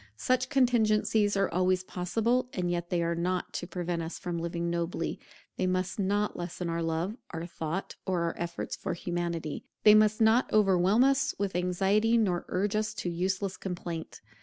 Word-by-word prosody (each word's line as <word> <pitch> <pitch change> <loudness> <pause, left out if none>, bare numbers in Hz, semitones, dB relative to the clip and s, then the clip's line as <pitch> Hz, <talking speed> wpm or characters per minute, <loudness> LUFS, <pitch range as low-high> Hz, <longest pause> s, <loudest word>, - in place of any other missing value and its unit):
Such 255 - +1
contingencies 220 -5 +3
are 195 -1 +3
always 185 +1 +1
possible, 225 +8 0
and 180 -2 -1
yet 175 0 -2
they 175 -1 +1
are 170 0 0
not 180 +2 -2
to 175 - -4
prevent 175 -1 -3
us 165 +1 -5
from 175 -1 -4
living 170 0 -2
nobly; 170 -1 -2 0.4
they 185 - +1
must 185 +2 -1
not 205 +2 0
lessen 175 0 -4
our 165 0 -1
love, 165 +6 -2
our 165 0 -5
thought, 170 +2 -4
or 185 -2 +1
our 170 - -1
efforts 170 0 -4
for - - -4
Humanity; 170 -3 -3 0.2
they 210 - +9
must 215 0 +5
not 225 +2 +4
overwhelm 195 +2 +4
us 275 0 +2
with 195 -3 -2
anxiety, 195 +6 +2
nor 185 -6 +1
urge 195 +3 -1
us 215 0 -1
to 180 -4 -3
useless 185 +2 -1
complaint. 175 -3 -6
185 Hz, 175 wpm, -29 LUFS, 170-210 Hz, 0.4 s, they